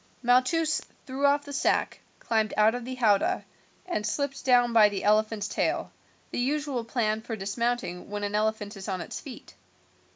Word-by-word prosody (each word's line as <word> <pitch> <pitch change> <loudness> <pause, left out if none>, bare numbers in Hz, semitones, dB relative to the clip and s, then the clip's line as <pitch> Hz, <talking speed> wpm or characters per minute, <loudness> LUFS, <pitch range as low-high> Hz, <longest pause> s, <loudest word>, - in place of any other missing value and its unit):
Malchus 300 +6 +3 0.2
threw 275 +1 +1
off 285 +1 +2
the 285 - -8
sack, 270 - +1 0.2
climbed 220 -1 0
out 215 +1 +5
of 245 -1 -5
the 255 +1 -5
howdah, 215 -5 +2 0.4
and 350 -12 -2
slipped 275 +5 -2
down 245 -2 +4
by 215 -2 +7
the 200 -2 -4
elephant's 215 0 +2
tail, - - -1 0.4
the - - -3
usual 275 -1 -1
plan 220 -2 -1
for 225 0 -5
dismounting 205 -1 -2
when 205 0 -4
an 205 0 -2
elephant 215 0 -1
is 195 -1 -8
on 190 -2 -2
its - - -6
feet. 270 -6 -11
230 Hz, 170 wpm, -27 LUFS, 210-260 Hz, 0.4 s, by